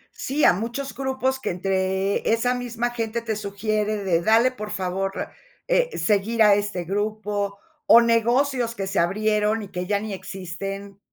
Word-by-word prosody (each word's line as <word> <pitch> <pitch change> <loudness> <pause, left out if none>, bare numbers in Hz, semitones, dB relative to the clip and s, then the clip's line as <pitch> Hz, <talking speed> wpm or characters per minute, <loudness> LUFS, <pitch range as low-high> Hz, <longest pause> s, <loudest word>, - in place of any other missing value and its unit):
Sí, 285 +3 -2
a - - +7
muchos 235 +7 -4
grupos 265 0 -1
que - - -3
entre 190 +2 0
esa 245 +2 +2
misma 240 -1 -2
gente 230 -1 -3
te 225 -2 -2
sugiere 210 +1 -1
de: 170 -3 +2
"Dale, 225 +6 +4
por 215 -4 -7
favor, 190 +1 -2 0.4
eh, - - +1
seguir 220 +2 +2
a 210 -1 +7
este 205 -3 -1
grupo", 205 +1 -2 0.3
o 235 - +9
negocios 235 +1 +2
que 195 - -3
se 190 -1 0
abrieron 210 +4 +1
y 200 - -9
que 180 -1 -4
ya 205 -1 +1
ni 215 -1 -5
existen. 195 +1 -6
210 Hz, 160 wpm, -24 LUFS, 195-235 Hz, 0.4 s, o